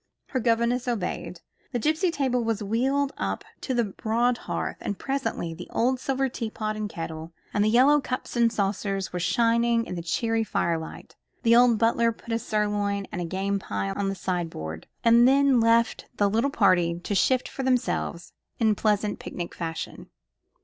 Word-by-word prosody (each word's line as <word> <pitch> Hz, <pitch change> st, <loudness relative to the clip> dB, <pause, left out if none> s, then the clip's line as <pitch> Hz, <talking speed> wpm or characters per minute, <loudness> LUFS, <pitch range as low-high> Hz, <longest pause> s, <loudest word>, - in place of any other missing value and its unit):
Her 260 Hz, -, -1 dB
governess 235 Hz, +1 st, +1 dB
obeyed. 225 Hz, -7 st, -3 dB, 0.3 s
The -, -, +1 dB
gipsy 315 Hz, -, +1 dB
table 260 Hz, -6 st, 0 dB
was 225 Hz, -2 st, -1 dB
wheeled 270 Hz, +7 st, 0 dB
up -, -, -2 dB, 0.2 s
to 260 Hz, -, -2 dB
the 240 Hz, -, +3 dB
broad 230 Hz, +4 st, 0 dB
hearth, -, -, -2 dB
and 200 Hz, -, -3 dB
presently 270 Hz, -11 st, -2 dB
the 175 Hz, +2 st, -9 dB
old 255 Hz, +2 st, +1 dB
silver 270 Hz, +1 st, 0 dB
tea 235 Hz, -3 st, -4 dB
pot 215 Hz, 0 st, -3 dB
and 215 Hz, -1 st, -3 dB
kettle, 165 Hz, -2 st, -6 dB, 0.2 s
and 205 Hz, -, +2 dB
the 215 Hz, -, +3 dB
yellow 270 Hz, +6 st, +5 dB
cups 255 Hz, -1 st, -4 dB
and 235 Hz, -1 st, +4 dB
saucers, 195 Hz, -2 st, -2 dB
were 180 Hz, -, -2 dB
shining 230 Hz, +5 st, +2 dB
in -, -, -6 dB
the 175 Hz, -, -4 dB
cheery 225 Hz, +6 st, 0 dB
firelight. 165 Hz, -6 st, -3 dB, 0.3 s
The 230 Hz, 0 st, +5 dB
old 240 Hz, -1 st, +6 dB
butler 230 Hz, +1 st, +3 dB
put 230 Hz, +1 st, -7 dB
a 230 Hz, -, +1 dB
sirloin 205 Hz, -3 st, -1 dB
and 175 Hz, -, -3 dB
a -, -, -2 dB
game 195 Hz, +3 st, -1 dB
pie 100 Hz, -, -3 dB
on 195 Hz, -, -1 dB
the 195 Hz, -, -2 dB
sideboard, 165 Hz, -, -4 dB, 0.2 s
and 235 Hz, +1 st, +6 dB
then 275 Hz, -1 st, +4 dB
left 230 Hz, 0 st, +2 dB
the 205 Hz, -, +3 dB
little 225 Hz, +7 st, +1 dB
party 185 Hz, -8 st, +3 dB
to 190 Hz, -, -4 dB
shift 250 Hz, +6 st, +2 dB
for -, -, -6 dB
themselves, 250 Hz, -9 st, -1 dB, 0.2 s
in 220 Hz, -2 st, +3 dB
pleasant 210 Hz, 0 st, 0 dB
picnic 175 Hz, -1 st, -6 dB
fashion. 165 Hz, -2 st, -6 dB
225 Hz, 175 wpm, -26 LUFS, 195-245 Hz, 0.3 s, old